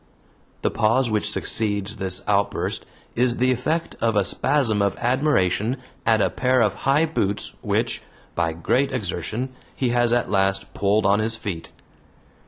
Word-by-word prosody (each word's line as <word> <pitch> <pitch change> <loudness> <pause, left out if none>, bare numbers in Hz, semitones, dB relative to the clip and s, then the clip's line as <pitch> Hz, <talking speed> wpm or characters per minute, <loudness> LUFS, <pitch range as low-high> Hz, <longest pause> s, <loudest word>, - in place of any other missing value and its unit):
The - - +1
pause 115 +3 +2
which 105 -1 +1
succeeds 105 -1 0
this 95 -2 -3
outburst 100 -1 0 0.3
is 120 0 +1
the 130 +1 +3
effect 155 +7 -1
of 115 -1 +1
a 100 -2 +3
spasm 110 -2 +1
of 100 -1 0
admiration 125 - +1 0.3
at 110 -2 +4
a - - +1
pair 130 -1 +2
of 105 -3 +2
high 140 +4 +2
boots, 105 -11 -2
which, - - -1 0.3
by 85 -1 0
great 130 +12 +1
exertion, 110 +1 -3 0.3
he 130 - 0
has 120 -1 +2
at 120 0 +2
last 95 -1 +1
pulled 100 +1 +1
on 100 +1 +4
his 110 +1 +1
feet. 100 -7 -5
110 Hz, 155 wpm, -23 LUFS, 100-125 Hz, 0.3 s, at